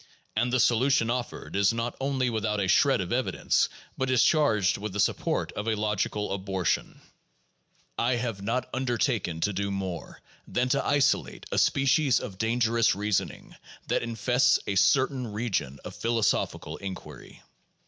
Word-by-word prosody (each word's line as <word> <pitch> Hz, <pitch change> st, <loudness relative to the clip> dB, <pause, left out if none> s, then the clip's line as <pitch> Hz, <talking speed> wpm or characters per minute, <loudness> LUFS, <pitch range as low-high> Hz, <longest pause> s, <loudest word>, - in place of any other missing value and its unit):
And 120 Hz, +3 st, +1 dB
the 130 Hz, -, +2 dB
solution 120 Hz, 0 st, +3 dB
offered 125 Hz, -4 st, -4 dB
is 100 Hz, 0 st, +4 dB
not 115 Hz, +1 st, -3 dB
only 130 Hz, -2 st, 0 dB
without 110 Hz, -2 st, -1 dB
a 95 Hz, -, 0 dB
shred 90 Hz, -, +4 dB
of -, -, -3 dB
evidence, -, -, +1 dB, 0.3 s
but 130 Hz, 0 st, -2 dB
is 125 Hz, -2 st, +4 dB
charged 110 Hz, -, +3 dB
with 105 Hz, -1 st, -5 dB
the 105 Hz, -, -4 dB
support -, -, 0 dB
of 105 Hz, -, -5 dB
a 110 Hz, -, +1 dB
logical 105 Hz, -1 st, -1 dB
abortion. 95 Hz, -2 st, -2 dB, 1.0 s
I 120 Hz, +2 st, +2 dB
have 115 Hz, -5 st, -3 dB
not 120 Hz, +5 st, -1 dB
undertaken 120 Hz, -, -1 dB
to 105 Hz, -, +1 dB
do 100 Hz, +1 st, -2 dB
more 95 Hz, -3 st, -5 dB, 0.3 s
than 125 Hz, +1 st, 0 dB
to 140 Hz, +1 st, +1 dB
isolate 145 Hz, -1 st, +1 dB
a -, -, +2 dB
species 135 Hz, 0 st, +3 dB
of 95 Hz, -1 st, -8 dB
dangerous 115 Hz, -1 st, +2 dB
reasoning 105 Hz, 0 st, -2 dB, 0.3 s
that -, -, +1 dB
infests 125 Hz, +2 st, +2 dB
a -, -, -1 dB
certain 125 Hz, +5 st, +2 dB
region 100 Hz, -, -2 dB
of -, -, -7 dB
philosophical 115 Hz, -2 st, -1 dB
inquiry. 90 Hz, -8 st, -9 dB
115 Hz, 150 wpm, -27 LUFS, 100-125 Hz, 1.0 s, is